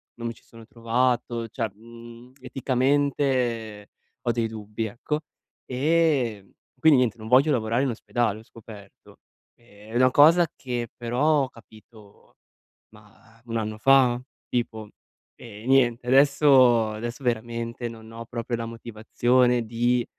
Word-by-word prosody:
non 115 0 -5
mi 115 - -4
ci - - -23
sono 115 -1 -15
trovato, 120 0 -1
cioè 115 -2 -4
mhmm, 115 +3 -14
eticamente 130 -4 -1 0.3
ho 120 - 0
dei 115 -1 -1
dubbi, 110 0 -5
ecco. 150 +8 -4 0.4
Ehm, 135 -7 0 0.3
quindi 150 -3 +5
niente, 120 -3 0
non 110 0 -9
voglio 135 +4 +5
lavorare 115 +2 0
in 135 - 0
ospedale, 115 -2 -2
ho - - -15
scoperto. 105 -3 -15 0.4
È 110 -1 -17
una 130 +1 +4
cosa 165 +5 +6
che 120 -3 -4
però 135 +5 +1
ho 130 - -4
capito 110 -2 -19 0.6
mah 115 +2 -21
1 115 0 -3
anno 110 -1 -4
fa? 130 -2 +4 0.3
Tipo. 110 -3 -3 0.5
E 110 -1 -12
niente 125 -2 +2
adesso 130 -4 +5
adesso 120 +5 -6
veramente 115 0 -3
non 110 -1 -12
ho 115 0 -8
proprio 120 +1 -4
la 115 - -4
motivazione 120 +2 0
di 120 +1 0
120 Hz, 135 wpm, -25 LUFS, 115-130 Hz, 0.6 s, cosa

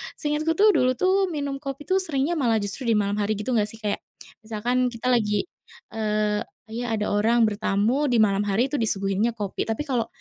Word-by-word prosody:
seingatku 305 +2 -1
tuh 420 +3 +6
dulu 255 -6 +2
tuh 380 +5 +2
minum 285 -4 -3
kopi 275 0 -6
tuh 380 +3 +1
seringnya 315 -1 -1
malah 235 -4 +2
justru 235 +5 -4
di 225 - +3
malam 205 0 0
hari 210 +1 0
gitu 210 +5 -3
nggak 215 -3 +2
sih? 225 - -7
Kayak, 205 - -1 0.4
misalkan 235 +3 -1
kita 245 +1 -2
lagi, 210 -4 +2 0.5
eee, 210 -1 0 0.2
kayak 235 +2 -5 0.2
ada - - -1
orang 225 +3 +3
bertamu 215 +6 +1
di 235 -3 +4
malam 200 0 +2
hari 235 +7 +1
itu 290 - -1
disuguhinnya 205 +1 0
kopi, 205 -1 -3
tapi 225 +7 -2
kalau, 245 -6 -1
230 Hz, 195 wpm, -24 LUFS, 210-275 Hz, 0.5 s, tuh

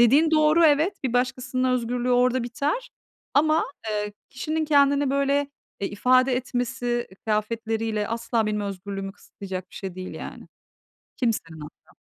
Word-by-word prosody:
dediğin 280 +7 +6
doğru 310 +1 +5
evet, 315 +4 +3
bir 250 - 0
başkasının 255 0 0
özgürlüğü 245 +1 -1
orada 250 +1 +3
biter 290 - -2 0.4
ama, 310 +2 +4 0.3
eee, 210 -1 -2 0.2
kişinin 310 +4 -2
kendini 285 -2 +4
böyle, 280 +1 +1 0.3
eee, 200 - -1
ifade 255 +4 +3
etmesi, 245 -1 -2
e - - -15
kıyafetleriyle 220 +1 -1
asla 230 -1 0
benim 210 0 -1
özgürlüğümü 195 0 -5
kısıtlayacak 185 -2 -8
bir - - -16
şey 190 -3 -6
değil 185 0 -7
yani. - - -8 0.7
Kimsenin 190 -10 -1
hatta. 150 - -13
245 Hz, 140 wpm, -25 LUFS, 210-280 Hz, 0.7 s, dediğin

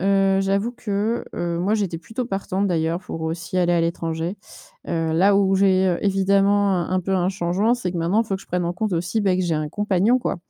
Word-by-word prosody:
heu, 195 0 +3
j'avoue 200 +4 0
que, 215 +1 -2
heu, 170 -1 -2
moi, 195 +5 +1
j'étais 190 -6 -2
plutôt 225 +8 -5
partante, 195 -2 -2
d'ailleurs, 165 0 0
pour 165 -3 -7
aussi 165 +3 -4
aller 175 -1 +2
à 170 - +3
l'étranger, 165 +2 -2 0.5
heu, 165 -1 -1
là 195 +4 +4
où 195 -1 +3
j'ai, 190 -1 +3
heu, 175 -1 0
évidemment, 200 +1 +3
un 175 0 -2
un 185 0 +1
peu, 190 +2 -2
un 180 -1 +1
changement, 195 +5 +1
c'est 190 -8 -4
que 175 - -3
maintenant, 185 +7 +2
il - - -11
faut 195 -2 -1
que - - -12
je - - -19
prenne 180 0 -1
en 175 - -1
compte 210 +1 -2
aussi, 175 +6 -1
ben, 190 -2 +1
que 185 - 0
j'ai 165 -2 0
un 155 0 -2
compagnon, 205 +6 +1
quoi. 235 - -2
190 Hz, 240 wpm, -22 LUFS, 170-200 Hz, 0.5 s, là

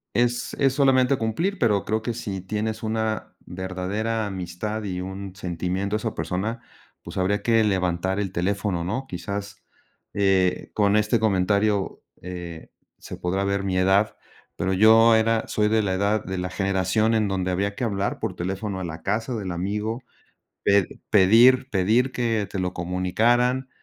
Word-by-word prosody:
Es 120 0 +1
es 135 -1 +3
solamente 135 -1 +3
cumplir, 165 - -1
pero 105 -4 +2
creo 110 +1 0
que 115 +1 -3
si 95 -4 -5
tienes 110 +3 -3
una 110 0 -2
verdadera 95 +5 -3
amistad 95 +3 -4
y 90 -3 -3
un 95 0 -7
sentimiento 95 +2 -2
a - - +2
esa 110 0 -4
persona, 110 +6 -3 0.4
pues, - - -9
habría 95 +2 +1
que 115 -1 +3
levantar 95 -1 0
el 95 -3 -2
teléfono, 95 0 -1
¿no? 120 +10 -3
Quizás, 100 +1 -6 0.5
eh, 95 -2 +1
con 105 -1 +2
este 105 +2 +2
comentario, 100 0 +1 0.2
eh, 90 -2 -8 0.3
se - - -9
podrá 95 +2 -1
ver 100 0 0
mi 95 -1 -1
edad, 95 +3 +3 0.4
pero 95 +1 -1
yo 110 +3 +6
era 110 0 +2
soy 105 0 +1
de 110 -1 +2
la 95 - 0
edad 100 +2 +1
de 95 +1 -4
la 90 - -3
generación 95 +3 +1
en 110 -2 +2
donde 95 -1 -1
había 100 +3 -1
que 130 - -4
hablar 100 -3 -1
por - - -3
teléfono 95 +2 -3
a 95 - -4
la 80 -1 -7
casa 115 +3 -1
del 100 -5 -4
amigo, 105 +7 -2 0.6
pe 100 -2 +4 0.2
pedir 120 +7 +6
pedir 110 +7 +2
que 115 -5 -1
te 100 - -4
lo 90 0 -2
comunicaran, 115 +9 +1
100 Hz, 165 wpm, -24 LUFS, 95-110 Hz, 0.6 s, yo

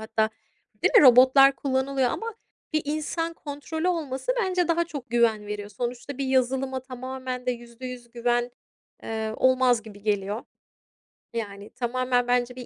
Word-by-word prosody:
hatta, 220 0 0 0.5
değil - - +2
mi? 410 - +9
Robotlar 265 +1 +7
kullanılıyor 265 -1 0
ama 455 -1 -4 0.4
bir 310 0 +1
insan 310 +3 -2
kontrolü 315 +4 -4
olması 310 - -1
bence 365 -4 +1
daha 340 0 +2
çok 285 -8 -8
güven 225 -3 +2
veriyor. 205 0 -5
Sonuçta 245 +5 -5
bir 275 - -1
yazılıma 260 0 +1
tamamen 255 0 -6
de - - +3
%100 240 0 -8
güven, 240 0 0 0.5
eee, 220 -1 -3
olmaz 255 -2 +3
gibi 205 -2 -13
geliyor. 205 +1 -1 0.9
Yani, 205 -3 -5
tamamen 245 0 0
bence 245 0 +1
bir 250 -1 -8
255 Hz, 140 wpm, -26 LUFS, 235-275 Hz, 0.9 s, mi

